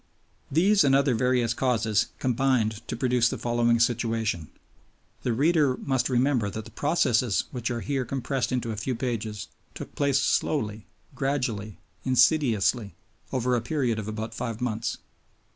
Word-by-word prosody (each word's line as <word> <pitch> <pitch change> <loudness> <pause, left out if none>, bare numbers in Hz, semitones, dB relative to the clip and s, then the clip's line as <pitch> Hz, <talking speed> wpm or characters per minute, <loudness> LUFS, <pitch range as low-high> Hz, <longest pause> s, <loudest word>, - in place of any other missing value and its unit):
These 190 +6 +4
and 135 -1 +4
other 140 -1 +3
various 120 0 +1
causes 110 -5 +1
combined 120 -4 +1
to - - -3
produce 125 -1 +2
the - - -4
following 120 -1 +1
situation. 115 -7 0 0.7
The 125 - -1
reader 145 +1 +2
must 135 -2 -1
remember 125 -4 +2
that 110 +2 -6
the - - -12
processes 130 -8 +1
which 120 -3 -3
are 120 -1 -3
here 140 -2 -1
compressed 135 +1 -2
into 120 -2 -1
a - - -3
few 125 +5 -2
pages 115 -4 -4 0.3
took - - -8
place 140 -2 +2
slowly, 110 -6 0 0.3
gradually, 125 - -2 0.3
insidiously, 120 -4 +2 0.4
over 125 -1 +1
a 120 - 0
period 120 -3 -1
of 105 - -5
about 110 +1 -5
five 115 -1 -4
months. 120 -2 -2
120 Hz, 145 wpm, -26 LUFS, 110-135 Hz, 0.7 s, These